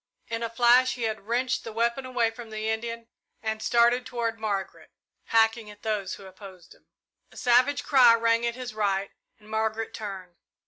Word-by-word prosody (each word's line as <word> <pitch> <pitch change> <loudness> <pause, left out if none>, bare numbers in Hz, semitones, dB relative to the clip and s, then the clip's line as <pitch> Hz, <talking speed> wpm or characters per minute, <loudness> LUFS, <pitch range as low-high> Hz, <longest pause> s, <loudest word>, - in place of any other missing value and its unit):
In 230 0 -3
a 230 - -2
flash 240 +2 +4
he 245 - -5
had 220 -2 -3
wrenched 250 +3 0
the 225 - -7
weapon 235 +4 -1
away 240 -3 +1
from 230 0 -10
the 215 0 -4
Indian 230 +1 -3 0.4
and 220 0 -2
started 240 +2 +3
toward 230 -2 -3
Margaret, 200 -3 -4 0.4
hacking 225 -1 +2
at 210 0 -14
those 210 -4 -2
who 195 - -13
opposed 190 -2 -13
him. - - -27 0.4
A - - -17
savage 250 +4 +3
cry 250 -5 +6
rang 230 0 +2
at 235 0 -1
his 250 -3 -6
right, 200 -2 -1 0.3
and 210 - -20
Margaret 220 0 -2
turned. 190 -4 -7
225 Hz, 180 wpm, -26 LUFS, 215-235 Hz, 0.4 s, cry